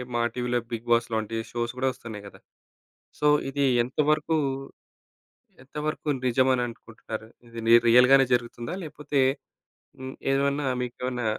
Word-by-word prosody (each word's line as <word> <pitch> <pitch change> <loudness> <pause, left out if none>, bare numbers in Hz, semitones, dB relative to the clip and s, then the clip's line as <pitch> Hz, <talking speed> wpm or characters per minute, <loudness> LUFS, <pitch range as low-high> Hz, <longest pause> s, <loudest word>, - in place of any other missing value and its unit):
మా 120 - +1
టీవీ‌లో 125 0 -1
big 115 +1 -5
boss 120 0 +3
లాంటి 110 0 -2
షోస్ 120 0 -3
కూడా 130 +1 0
వస్తున్నాయి 110 -4 -9
కదా! - - -14 0.8
సో, 150 - 0 0.2
ఇది 140 +1 0 0.2
ఎంతవరకు 150 +4 +1 1.3
ఎంతవరకు 150 +2 -4 0.2
నిజమని 130 +1 +3
అనుకుంటున్నారు? 110 -1 -9 0.2
ఇది 115 0 -9
ని 115 - +6
రియల్ 125 +2 +7
గానే 135 0 +7
జరుగుతుందా? 120 +4 -2
లేకపోతే 150 -2 -3 0.8
హ్మ్, 130 0 -7 0.2
ఏమన్నా 140 +1 +1 0.2
మీకేమన్నా 125 0 -4
125 Hz, 125 wpm, -26 LUFS, 115-140 Hz, 1.3 s, రియల్